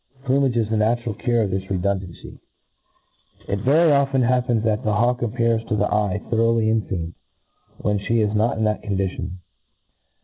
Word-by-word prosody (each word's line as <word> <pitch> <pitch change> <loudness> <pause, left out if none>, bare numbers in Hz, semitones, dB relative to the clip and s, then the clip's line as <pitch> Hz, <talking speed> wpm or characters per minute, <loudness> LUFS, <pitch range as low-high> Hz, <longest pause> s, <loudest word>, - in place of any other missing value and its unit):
Plumage 135 -2 +1
is 115 -2 +1
the 110 - +1
natural 115 +1 0
cure 120 +2 0
of 100 - -2
this 95 0 -3
redundancy, 95 -2 -3 1.1
Very 140 - +3
often 135 -2 +2
it - - +2
happens 125 -3 +1
that 110 -1 0
the 110 - 0
hawk 120 +3 +1
appears 115 -1 0
to 110 - -1
the 105 0 0
eye 105 -1 0
thoroughly 115 -1 +2
enfeamed, 90 -6 -2 0.6
when 105 -1 -1
flic 110 +1 +1
is 105 - -4
not 110 +2 +1
in 110 - -1
that 105 0 0
condition. 95 -2 -3
110 Hz, 165 wpm, -22 LUFS, 100-120 Hz, 1.1 s, Very